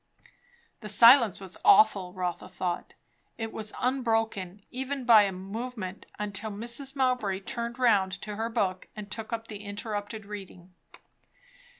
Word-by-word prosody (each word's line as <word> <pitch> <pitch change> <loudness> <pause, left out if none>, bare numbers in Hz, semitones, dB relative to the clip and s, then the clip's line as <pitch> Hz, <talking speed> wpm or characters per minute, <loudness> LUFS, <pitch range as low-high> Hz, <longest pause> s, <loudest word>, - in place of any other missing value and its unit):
The 215 - -8
silence 230 0 +7
was 190 -2 -8
awful, 195 -3 +5
Rotha 180 -1 -4
thought. 175 -1 -4 0.4
It 225 -1 -4
was 215 -1 -3
unbroken, 225 -7 -1
even 265 +1 -4
by 220 -3 +8
a 195 - -1
movement, 195 +1 -6
until 210 +1 -3
Mrs. 235 +6 -4
Mowbray 250 -8 0
turned 235 +4 -4
round 210 -7 +3
to 210 -1 -5
her 225 +2 -2
book 195 -5 -1
and 210 -1 -8
took 225 -1 -5
up 225 0 -4
the 210 -2 -7
interrupted 205 +1 -5
reading. 190 -3 -10
215 Hz, 135 wpm, -28 LUFS, 195-235 Hz, 0.4 s, by